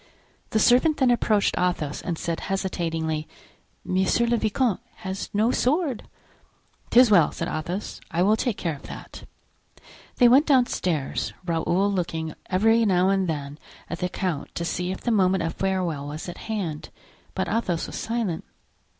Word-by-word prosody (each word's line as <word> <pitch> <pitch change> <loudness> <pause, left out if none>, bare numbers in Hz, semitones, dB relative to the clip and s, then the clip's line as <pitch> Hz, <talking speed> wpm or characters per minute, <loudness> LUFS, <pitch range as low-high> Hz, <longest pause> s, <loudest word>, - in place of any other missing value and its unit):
The - - 0
servant 255 +8 +4
then 260 -3 +4
approached 215 -4 +2
Athos 165 -5 -1
and 170 -2 -3
said, 165 0 -3
hesitatingly: 165 -5 -2 0.6
"Monsieur 190 +5 +2
le 235 0 +2
vicomte 225 -1 +1 0.3
has 190 +1 -4
no 215 +4 +2
sword." 280 -1 0 0.8
"'Tis 245 -2 +6
well," 175 -7 +6
said - - -4
Athos, 175 +6 -4
"I 170 +2 +1
will 210 +3 +4
take 225 -1 -1
care 165 -3 -2
of 140 - -13
that." - - -10 0.9
They 245 - +6
went 265 +5 +5
downstairs, 185 - +1
Raoul 175 +4 +1
looking 165 -4 -2 0.2
every 225 +5 +4
now 185 -3 +3
and 195 -1 +1
then 145 -1 -4 0.3
at 170 - -4
the 180 - -1
count 180 -6 -3
to 170 - -2
see 180 +2 -2
if 190 - -6
the 240 - 0
moment 190 -4 +3
of 165 0 -2
farewell 180 -7 -1
was 150 +4 -6
at 175 - -7
hand, 180 -9 -3 0.5
but - - -1
Athos 185 -7 -1
was - - -8
silent. 225 -7 -2
185 Hz, 160 wpm, -25 LUFS, 165-225 Hz, 0.9 s, Tis